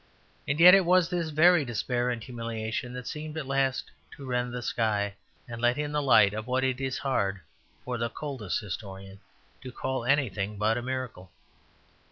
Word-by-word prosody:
And 145 +2 -1
yet 180 +2 +10
it 195 -1 +7
was 180 0 +3
this 170 -2 -1
very 160 +2 +5
despair 120 0 -1
and 120 -2 -3
humiliation 115 -1 -4
that 125 -1 -7
seemed 155 +1 -6
at 155 - -3
last 135 -1 0 0.3
to 140 - -9
rend 125 -1 -1
the 125 0 -5
sky, 105 -4 0 0.3
and 115 -1 -7
let 120 +2 +2
in 150 0 -2
the 150 0 0
light 110 -7 +5
of 110 +1 -5
what 130 +1 0
it 130 0 0
is 130 -1 -2
hard 100 -8 -1 0.5
for 125 -1 -3
the 115 0 -1
coldest 130 -8 -4
historian 95 -1 -8 0.4
to 130 - -8
call 130 0 -3
anything 110 -7 0
but 105 +2 +2
a 120 - -2
miracle. 125 -7 -5
125 Hz, 185 wpm, -28 LUFS, 110-140 Hz, 0.5 s, yet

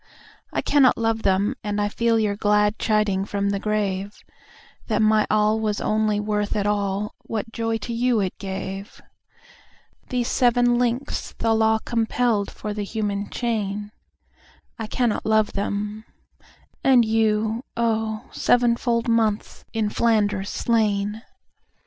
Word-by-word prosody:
I - - -2
cannot 275 -3 +4
love 225 -1 0
them; 200 +4 +2
and 210 0 -2
I 205 - +1
feel 230 +2 +1
your 210 -2 +1
gladChiding 210 -1 +1
from 200 -1 -1
the 200 - -1
grave, 205 -1 -2 0.7
That - - 0
my 215 -1 +3
all 215 +1 +2
was 210 -2 -1
only 215 -1 +1
worth 210 0 -1
at 205 -1 0
all, 205 0 -1 0.2
whatJoy 225 0 -2
to 235 - -4
you 240 0 +2
it 190 -3 -1
gave. 195 +1 -6 1.1
These 245 -2 -1
seven 245 -1 +3
links 245 +2 -2
the 225 -1 +1
Law 220 0 +3
compelledFor 225 -2 -1
the 205 0 -3
human 205 -1 -3
chain—I 215 0 -6
cannot 235 0 0
love 215 -1 +2
them; 205 +2 -3 0.8
and 255 -3 +5
you, 220 +1 +1
oh, 220 -1 -1
Seven 240 -1 +3
fold 235 -1 0
months 225 -2 0
in 220 -2 -1
Flanders 205 -4 +1
slain! 210 -2 0
215 Hz, 125 wpm, -23 LUFS, 205-230 Hz, 1.1 s, and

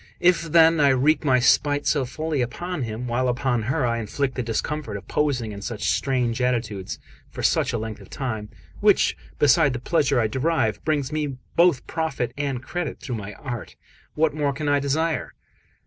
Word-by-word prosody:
If 180 0 +4
then 165 0 +6
I 145 -1 +5
wreak 135 +5 +3
my 130 -4 +4
spite 145 +4 +3
so 140 -4 +2
fully 155 +2 -2
upon 175 +7 -3
him, 115 0 -4
while 125 +1 0
upon 125 -1 0
her 130 +5 0
I 115 -1 0
inflict 130 +5 -2
the 125 - -2
discomfort 115 0 -3
of 100 - -12
posing 130 -7 0
in 100 -1 -8
such 110 0 -2
strange 125 -3 0
attitudes 115 -6 -1 0.3
for - - -7
such - - +2
a - - -1
length 110 -1 -5
of 100 - -14
time 110 -6 -4 0.3
which, - - +4 0.2
beside 145 0 +4
the 125 - -3
pleasure 140 -1 +1
I 115 - +2
derive, 130 0 0
brings 145 -3 0
me 150 -3 -2 0.2
both 170 -6 +4
profit 140 -7 -2
and 140 -3 -3
credit 175 0 -4
through 125 - -6
my 105 0 -7
art 120 0 -7 0.4
what 155 0 +2
more 145 -2 0
can 150 +2 -4
I 145 0 +3
desire?" 155 +4 -1
130 Hz, 185 wpm, -24 LUFS, 120-150 Hz, 0.4 s, then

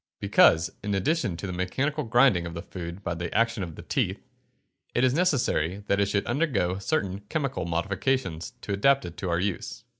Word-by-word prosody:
_ - - -69
Because, 80 +2 +4
in 100 -1 -1
addition 100 - 0
to 90 - -6
the 90 - -4
mechanical 135 - -1
grinding 115 -7 +4
of 85 - -7
the 85 - -5
food 90 +1 -7
by 90 - -2
the 85 +1 -4
action 115 -1 +2
of 85 -4 -5
the - - -10
teeth, - - -1 0.8
it 120 - +3
is 130 -1 +4
necessary 120 - +1
that 100 -1 +1
it 100 - +3
should 100 0 0
undergo 120 - 0
certain 100 -6 -1
chemical 135 - -2
modifications 95 +3 -1
to 100 - -3
adapt 135 +7 +3
it 85 - -7
to 90 +1 -3
our 85 0 +1
use. 95 0 -3
100 Hz, 200 wpm, -27 LUFS, 85-130 Hz, 0.8 s, Because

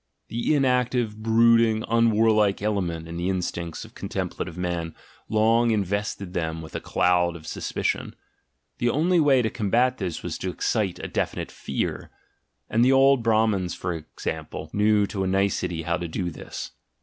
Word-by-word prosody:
The 120 +6 0
inactive, 125 -5 +1
brooding, 115 0 +4
un 115 0 +3
warlike 110 -2 +3
element 90 -6 -2
in 85 0 -6
the 90 +2 -1
instincts 85 -3 -3
of - - -16
contemplative 85 - -4
men 85 -2 -3 0.3
long 115 +2 +3
invested 100 -2 -1
them 80 -3 -2
with 80 - -11
a - - -1
cloud 90 -1 +2
of 80 -2 -11
suspicion: - - -2 0.6
the 120 - +2
only 170 +7 +2
way 135 -5 +4
to 110 - +1
combat 120 +4 +1
this 90 -5 -4
was - - -4
to 95 - -2
excite 95 +1 -1
a - - -5
definite - - -3
fear. 70 - -3 0.6
And 115 +2 +2
the 130 - +5
old 135 -1 +5
Brahmans, 110 -5 +1
for 90 0 -3
example, 80 0 -6
knew 105 0 +3
to 100 -2 -3
a - - 0
nicety 95 -3 0
how 85 +2 0
to 85 -1 -4
do 85 +2 -3
this! 75 - -7
105 Hz, 160 wpm, -25 LUFS, 90-115 Hz, 0.6 s, the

